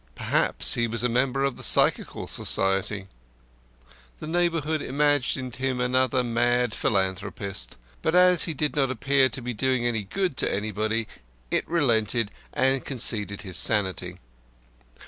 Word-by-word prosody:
Perhaps - - +1
he 115 0 +1
was 115 0 -2
a 125 - +1
member 130 +3 0
of 140 -2 -1
the - - -10
Psychical - - +3
Society. 95 +1 -1 1.1
The - - -9
neighbourhood 160 -2 -1
imagined 135 -3 -1
him 130 -1 -2
another 130 0 +1
mad 120 0 0
philanthropist, 95 - -2 0.2
but 160 - 0
as 180 -1 +5
he 160 - -4
did 150 +2 -2
not 135 -3 +1
appear 130 +2 +2
to 130 - -5
be 125 0 -4
doing 130 +1 0
any 115 -3 0
good 165 - -3
to - - 0
anybody 110 +2 -2 0.4
it - - 0
relented 115 -8 +1 0.2
and 130 0 +1
conceded 110 -6 -1
his 95 -4 0
sanity. 95 -4 +3
125 Hz, 140 wpm, -25 LUFS, 105-135 Hz, 1.1 s, as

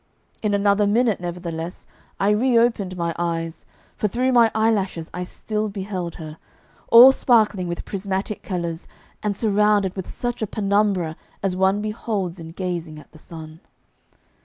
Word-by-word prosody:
In 210 -2 +1
another 200 0 +3
minute, 225 0 +2
nevertheless, 175 -1 -5 0.3
I 200 +1 +3
reopened 230 -4 +2
my 170 -1 -1
eyes, 165 -1 -3 0.3
for 210 - 0
through 250 +6 0
my 235 -2 +5
eyelashes 200 -7 0
I 180 - -3
still 215 +3 -3
beheld 190 -4 -5
her, 155 -1 -9 0.5
all 245 +3 +10
sparkling 215 -8 +2
with 170 0 -5
prismatic 195 +1 -3
colours, 170 -3 -4 0.3
and 205 -2 -2
surrounded 210 -3 +2
with 190 -2 -6
such 245 -1 -4
a 220 - 0
penumbra 200 -5 0 0.3
as 190 -2 0
one 190 +2 +2
beholds 210 -4 -3
in 165 -1 -8
gazing 175 -4 -4
at 150 - -14
the 155 - -16
sun. 160 -1 -10
195 Hz, 145 wpm, -22 LUFS, 175-215 Hz, 0.5 s, all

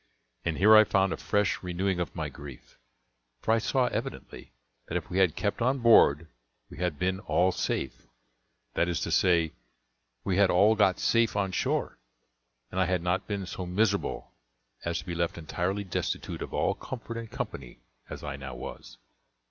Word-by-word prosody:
And 85 -3 -1
here 105 +3 +7
I 110 - +9
found 95 -2 +2
a - - -4
fresh 105 -1 0
renewing 90 +1 -1
of 85 -4 -3
my - - -2
grief; 70 -5 -12 0.6
for 110 - -1
I 115 - +4
saw 130 +3 +1
evidently - - -5 0.4
that - - -1
if - - -7
we 95 - +1
had 90 -5 +3
kept 105 +2 -2
on 130 +3 +2
board 110 - +5 0.5
we - - -10
had 90 -4 -1
been 95 +3 0
all 95 -2 +2
safe - - -3 0.7
that 85 - +1
is 85 - -1
to - - -2
say, 85 -3 +3 0.7
we 95 -2 0
had 100 -2 +5
all 100 +5 +5
got 100 -4 +3
safe 115 -2 +2
on 100 -2 0
shore, 90 - -1 0.7
and 95 - -2
I 95 - +4
had 90 -1 0
not 90 +2 0
been 100 -2 -3
so 90 0 -6
miserable 100 +2 0 0.5
as 85 0 -1
to - - -6
be 90 - -4
left 85 +3 -1
entirely 90 +5 -2
destitute 95 - -3
of - - -5
all - - +1
comfort 120 -2 -7
and 115 -1 -6
company 65 -10 -6 0.3
as - - -8
I 70 -2 -5
now 70 -2 -7
was. - - -9
95 Hz, 180 wpm, -28 LUFS, 85-105 Hz, 0.7 s, I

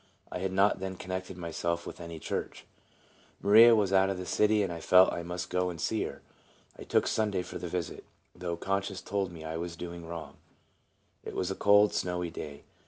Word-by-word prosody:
I - - -4
had 95 +1 -2
not 95 +1 +3
then 95 0 -4
connected 95 0 -5
myself 85 0 -2
with - - -8
any 85 -1 -7
church. - - -4 0.7
Maria 115 +3 +8
was 100 -3 +1
out 95 0 +5
of 95 - -2
the 90 - -5
city, 105 +2 +3
and 90 -3 -2
I 85 - -6
felt 90 +3 +6
I 85 - -3
must 90 +1 -5
go 90 0 +1
and 85 -2 -7
see - - 0
her. - - -8 0.5
I - - -10
took - - +2
Sunday 105 -4 0
for 90 - -7
the 90 - -5
visit, 85 -1 -4 0.3
though 85 -1 -4
conscience 95 +1 -2
told 100 -2 -2
me 80 -2 -9
I 80 +1 -4
was 85 0 -4
doing 85 -1 -7
wrong. 85 -1 -7 0.9
It - - -7
was 90 +1 -1
a - - -2
cold, 105 +1 +5
snowy 90 -1 -2
day. 70 -3 -8
90 Hz, 205 wpm, -30 LUFS, 85-95 Hz, 0.9 s, Maria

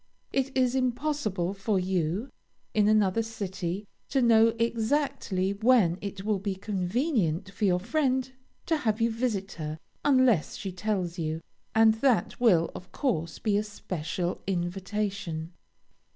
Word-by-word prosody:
It 270 0 +1
is 255 -1 +3
impossible 250 - 0
for 200 0 0
you, 185 - -1 0.4
in 210 -1 +3
another 215 0 +3
city, 200 -3 -4 0.2
to 275 - +2
know 230 -2 +6
exactly 230 -4 0
when 205 -5 +3
it 200 -1 -5
will 210 -2 +1
be 195 0 -2
convenient 190 - -1
for 205 +2 -1
your 180 -2 +3
friend 260 +3 0 0.3
to 325 - +2
have 225 -6 0
you 230 0 +2
visit 220 -4 -1
her, 155 0 -4 0.3
unless 255 - +3
she 195 - -4
tells 180 -2 -2
you, 160 0 -2 0.4
and 220 0 +6
that 260 -5 +2
will, 180 -9 +4
of 180 - -10
course, 170 - -1
be 210 -2 +1
a 210 - +1
special 180 -4 -4
invitation. 185 -2 -2
205 Hz, 135 wpm, -28 LUFS, 185-235 Hz, 0.4 s, know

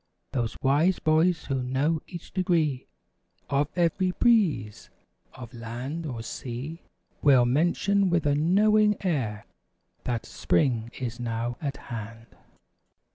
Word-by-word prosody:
Those 120 -4 -2
wise 155 +7 +3
boys 160 +2 +2
who 135 -2 -1
know 140 +6 0
each 175 -2 -9
degree 165 -8 0 0.6
Of 140 +1 +2
every 180 +2 +2
breeze 180 - +1 0.5
of 125 -1 -10
land 125 +8 -5
or 120 -5 -5
sea, 135 +7 -6 0.4
Will 130 -4 +6
mention 175 +8 +2
with 170 -3 +1
a 145 - +3
knowing 210 +7 +3
air. 115 - -1 0.6
That, 120 -2 -2
"Spring 120 -6 0
is 120 -1 -4
now 120 0 -2
at 140 -2 -3 0.2
hand." 115 +1 -8
140 Hz, 120 wpm, -27 LUFS, 120-170 Hz, 0.6 s, Will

